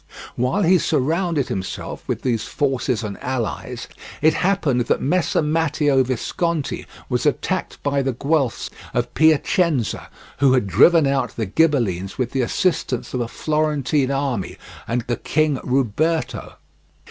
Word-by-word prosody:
While 130 +12 +1
he 180 +1 +5
surrounded 160 +1 0
himself 95 -1 -5
with - - -3
these 120 -4 0
forces 130 -5 -1
and 100 -2 -6
allies, 125 -5 -3 0.3
it 155 +1 +4
happened 150 -12 +1
at - - +3
Messer 165 +2 +1
Matteo 150 -3 +2
Visconti 145 +5 -2 0.2
was - - 0
attacked - - -1
by 140 -1 +1
the 135 -1 -1
Guelphs 140 -1 -1 0.2
of 120 0 -1
Piacenza, 155 - +2 0.3
who 135 -2 +5
had 125 -5 +2
driven 160 - +5
out 135 -2 0
the 115 - -2
Ghibellines 105 - +1
with 125 -3 -1
the 135 - 0
assistance 130 -1 -1
of 125 - -1
a 120 - -2
Florentine 150 -1 0
army 135 -7 -2 0.3
and 120 +1 0
the 120 -1 -2
King 155 0 +1
Ruberto. 135 +2 0
135 Hz, 135 wpm, -21 LUFS, 125-155 Hz, 0.3 s, he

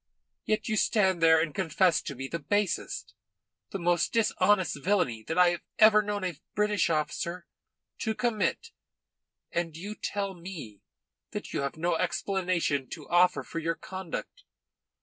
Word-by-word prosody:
Yet 215 0 0
you 215 -1 0
stand 190 -5 +2
there 160 -1 +6
and 160 -2 -1
confess 185 -1 +2
to 140 - -6
me 135 +2 -5
the 170 - -4
basest, 205 +5 -1 0.6
the - - -4
most 175 -1 +1
dishonest 205 - +2
villainy 180 - +1
that 160 - -2
I 180 -1 +7
have 175 -1 -2 0.2
ever 215 -1 +7
known 205 -1 -3
a 175 -5 -4
British 210 -3 +2
officer 170 +3 -2 0.5
to 220 -1 -1
commit, 240 - -1 0.8
and 165 -2 -2
you 200 +5 -5
tell 200 -2 -3
me 170 - -9 0.5
that - - -5
you - - 0
have 140 +2 -3
no 170 +1 +1
explanation 175 -5 0
to 155 -4 -8
offer 175 -5 +4
for 130 +7 -5
your 165 +1 -1
conduct. 190 - -7
180 Hz, 150 wpm, -29 LUFS, 165-205 Hz, 0.8 s, I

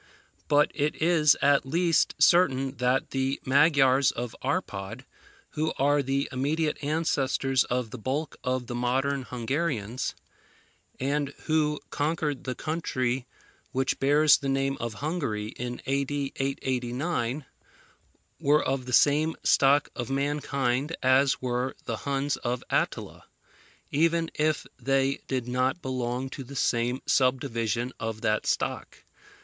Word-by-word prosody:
But 145 0 +4
it 150 0 -1
is 160 -3 +4
at 140 0 +4
least 165 +4 +1
certain 140 -4 +3
that 125 +2 +1
the 135 +1 -1
Magyars 135 -1 +4
of 120 -1 -5
Arpad, 125 - -3 0.5
who 155 +1 -1
are 145 +1 +3
the 135 +1 -1
immediate 150 +4 -1
ancestors 135 -3 +1
of 125 -2 -2
the 130 - -7
bulk 135 +6 -3
of 125 -1 -1
the 120 - -6
modern 130 +3 0
Hungarians, 125 -2 -2 0.8
and 140 +1 -1
who 150 -1 +1
conquered 150 -2 -1
the 130 -1 -3
country 130 -6 -2 0.5
which 130 0 0
bears 145 +2 +5
the 140 - -3
name 135 0 0
of 115 -2 -4
Hungary 130 -11 -2
in 120 +1 -6
A.D. 140 +1 -1
889, 130 +1 -2 0.9
were 150 +2 +3
of 130 -1 -2
the 125 - -4
same 150 +5 +4
stock 140 +1 +4
of 120 0 -4
mankind 140 0 -1
as 130 +1 +3
were 125 +1 -1
the 115 - -3
Huns 140 +2 -1
of 120 0 -3
Attila, - - -2 0.7
even 165 +2 +2
if 155 0 0
they 135 +2 +1
did 130 -3 -2
not 130 +6 0
belong 130 0 -2
to 135 - -6
the 140 +2 -11
same 125 0 0
subdivision 125 -2 0
of 115 -1 -4
that 110 -2 0
stock. - - -2
135 Hz, 130 wpm, -27 LUFS, 125-145 Hz, 0.9 s, bears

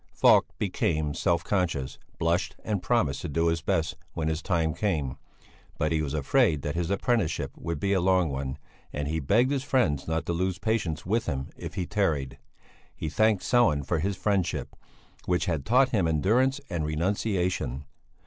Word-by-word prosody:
Falk - - +5
became 75 -2 0
self 85 +2 +1
conscious, 80 -9 -1 0.2
blushed 85 +3 0
and 105 -4 -1
promised 85 - +1
to 85 - -4
do 80 +3 +1
his 80 0 -1
best 80 0 0 0.2
when 80 -2 -1
his 80 0 -2
time 80 -3 0
came; 80 -8 -1 0.6
but 75 +1 0
he 80 -1 +1
was 75 -1 -2
afraid 75 +1 +2
that 75 - -2
his 85 0 -2
apprenticeship 95 - 0
would 85 -2 -4
be 100 +5 +1
a 95 - +2
long 90 -2 +3
one, 65 -1 -3 0.3
and 75 -1 -3
he 80 +2 -1
begged 115 - +3
his 135 -2 0
friends 95 - +1
not 80 0 -1
to 85 - -1
lose 90 +1 -1
patience 95 -8 -1
with 110 +5 0
him 70 -4 -3
if - - -8
he 90 -3 -1
tarried; 80 -10 -1 0.6
he 80 - -4
thanked 110 +3 +2
Sellén 80 - +3
for 85 +1 0
his 95 +4 -1
friendship, 95 -2 -1 0.5
which 90 +1 +1
had 80 -7 -2
taught 130 +3 +5
him 100 -9 +1
endurance 115 - +2
and 85 -4 -2
renunciation. 90 - -1
85 Hz, 175 wpm, -27 LUFS, 75-100 Hz, 0.6 s, Falk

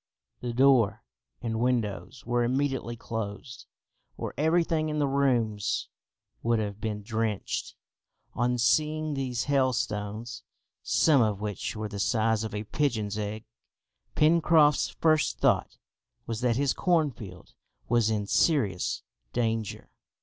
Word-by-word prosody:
The 120 - -4
door 120 -4 +4 0.4
and 110 -1 -2
windows 115 -4 -1
were 120 0 +1
immediately 130 -1 -1
closed, 115 +2 -6 0.5
or - - -4
everything 160 +1 +1
in 150 - -2
the 145 - +2
rooms 120 -7 0 0.5
would 115 0 +2
have 105 -1 -3
been 105 -2 -3
drenched. 110 -1 -2 0.6
On 125 +1 0
seeing 155 +5 +1
these 130 -4 -2
hailstones, 120 -5 -1 0.4
some 150 -5 +4
of 105 -3 +1
which 105 0 -4
were 110 0 -3
the 100 -1 -7
size 110 0 +1
of 110 -2 -5
a 105 - -3
pigeon's 110 -5 -1
egg, 105 +1 -4 0.7
Pencroft's 155 -1 +4
first 155 -2 +1
thought - - +1 0.5
was 115 0 -4
that 120 -2 +2
his 135 0 +1
cornfield 135 - -1 0.3
was 120 -2 +3
in 105 -2 -1
serious 105 - +1 0.3
danger. 115 -3 -2
120 Hz, 120 wpm, -28 LUFS, 110-140 Hz, 0.7 s, door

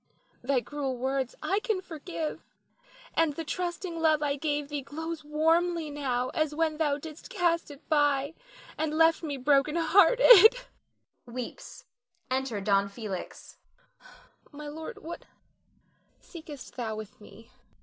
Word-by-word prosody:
Thy 255 0 +1
cruel 275 -1 -4
words 265 0 -2
I 390 +2 +1
can 430 -3 -1
forgive, 330 -2 -5 0.7
and 325 -3 +2
the 330 - -4
trusting 345 +1 -4
love 310 -2 +3
I 285 -1 +1
gave 290 0 -2
thee 290 -1 -3
glows 320 +4 -5
as - - -18
warmly 325 +1 +1
now 255 -3 -1
as 310 -1 -1
when 315 -1 0
thou 295 -3 +1
didst 310 - -10
cast 345 -8 0
it 290 +1 -13
by 290 -1 +2 0.5
and 310 0 -1
left 325 0 +4
me 295 -4 -4
broken 280 +3 +2
hearted 405 +7 +7 0.7
[weeps; 245 0 -8 0.5
enter 260 -5 -1
Don 200 0 +2
Felix]. 200 -3 -6 1.2
My 295 0 -8
lord, 320 +9 -7
what 335 +2 -7 0.9
seekest 310 -6 -11
thou 225 -3 -3
with 215 -1 -9
me? 225 +2 -15
300 Hz, 135 wpm, -28 LUFS, 270-330 Hz, 1.2 s, hearted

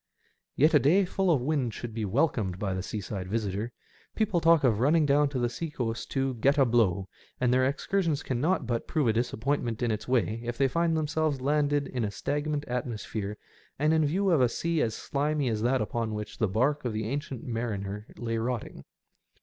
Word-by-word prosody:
Yet 155 +4 +4
a 150 - +7
day 180 +9 +4
full 190 +1 0
of 150 -7 +3
wind 130 -4 -1
should 120 -2 -6
be 110 -1 -2
welcomed 105 - 0
by 95 -1 -2
the 95 - -2
seaside 100 -1 -5
visitor. 105 +1 -2 0.4
People 210 -6 +1
talk 165 -2 +5
of 115 -5 +3
running 150 +5 +4
down 145 0 +3
to 140 - -4
the 120 -1 +1
sea 160 +7 -4
coast 115 -5 -3
to 135 -1 0
*' 115 - -12
get 140 +4 +4
a 135 - +5
blow," 100 -6 +2 0.3
and 125 -1 +2
their 130 0 +4
excursion 165 +4 0
cannot 140 +4 0
but 120 -1 -2
prove 145 -7 +1
a - - +3
disappointment 120 0 -1
in 120 - +1
its 105 - -3
way 115 -3 +1
if 120 0 -4
they 135 - +3
find 165 +4 +1
them 155 - 0
selves 155 -2 0
landed 145 +1 +1
in 125 -3 -3
a 105 - 0
stagnant 145 +7 -2
atmosphere 110 -4 -4 0.4
and 150 +3 +2
in 160 -1 +3
view 185 +6 +1
of 160 -6 +4
a 125 - +4
sea 165 +5 -1
as 110 -1 0
slimy 145 0 -1
as 110 -2 -1
that 125 +3 +2
upon 110 0 -2
which 105 0 -6
the 110 - +2
bark 130 +10 +1
of 120 -3 -2
the 110 0 -2
Ancient 135 -1 -4
Mariner 105 -3 -4
lay 115 -1 -2
rotting. 120 0 -4
125 Hz, 210 wpm, -28 LUFS, 110-150 Hz, 0.4 s, a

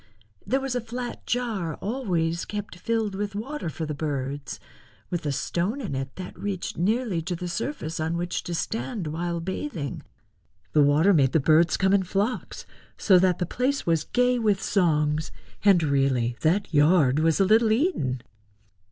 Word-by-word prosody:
There 265 - +2
was 270 -1 -3
a 245 - -1
flat 240 +2 -6
jar 215 -10 -1
always 175 -8 -1
kept 205 -4 -6
filled 225 -1 -1
with 200 +1 -3
water 260 - -4
for 160 +1 -4
the 150 - -3
birds, 140 -2 -4 0.5
with 170 -4 -2
a - - +1
stone 175 - -1
in 215 - -4
it 135 0 -4
that 185 -1 -7
reached 200 -3 -4
nearly 210 0 0
to 175 +2 -3
the 180 +1 -5
surface 170 - -4
on 160 +2 -1
which 175 +1 -2
to 175 - -3
stand 220 +1 -3
while 170 +2 -2
bathing. 170 - -4 0.7
The 150 - +5
water 150 +7 +5
made 135 -6 +3
the 160 - +4
birds 160 +4 +4
come 190 0 +2
in 200 - +4
flocks, 200 +6 -2 0.3
so 190 -3 +5
that 180 -1 +3
the 180 - -1
place 260 +9 -1
was 165 -2 +1
gay 250 0 +2
with 210 -4 +2
songs, 155 -6 +1 0.3
and 195 -5 +5
really 135 -5 +1
that 175 +3 +1
yard 150 -2 +4
was 160 +2 +2
a 195 - +5
little 220 +2 +4
Eden. 215 - 0
175 Hz, 170 wpm, -26 LUFS, 155-215 Hz, 0.7 s, The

